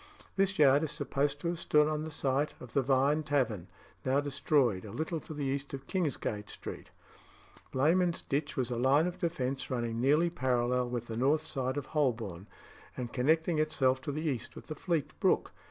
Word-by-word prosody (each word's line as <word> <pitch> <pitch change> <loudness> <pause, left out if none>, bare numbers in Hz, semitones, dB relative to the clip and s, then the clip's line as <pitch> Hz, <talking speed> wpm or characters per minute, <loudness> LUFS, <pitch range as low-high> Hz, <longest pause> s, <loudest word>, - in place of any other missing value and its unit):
This 195 0 +1
yard 140 -1 +6
is 160 - -1
supposed 145 -1 -1
to - - -2
have 170 -1 -3
stood 150 0 +4
on 155 0 -1
the 160 - -5
site 145 0 0
of 125 - -10
the 140 - +3
Vine 135 +3 +3
Tavern 130 - 0 0.4
(now 130 +2 +2
destroyed), 140 -7 +1
a 105 - -8
little 160 - -3
to - - -12
the 150 -2 -4
east 140 +1 -2
of 135 0 -10
Kingsgate 135 - -2
Street. - - -8 0.8
Blemund's 170 +6 +2
Ditch 145 0 -2
was 125 -1 0
a 120 - -1
line 135 +6 +4
of 180 0 -4
defence 135 -6 -2
running 120 -2 -2
nearly 150 +6 +3
parallel 125 -3 +1
with 120 -1 -3
the 115 -1 -5
north 145 +5 +2
side 130 -1 -2
of 145 - -2
Holborn, 115 - -1 0.5
and 120 -2 -4
connecting 160 +5 +2
itself 135 -4 +2
to 145 - -3
the 155 +3 -3
east 130 -6 -3
with - - -10
the 155 - -6
Fleet 165 -2 -1
brook. - - +2
140 Hz, 190 wpm, -31 LUFS, 125-155 Hz, 0.8 s, yard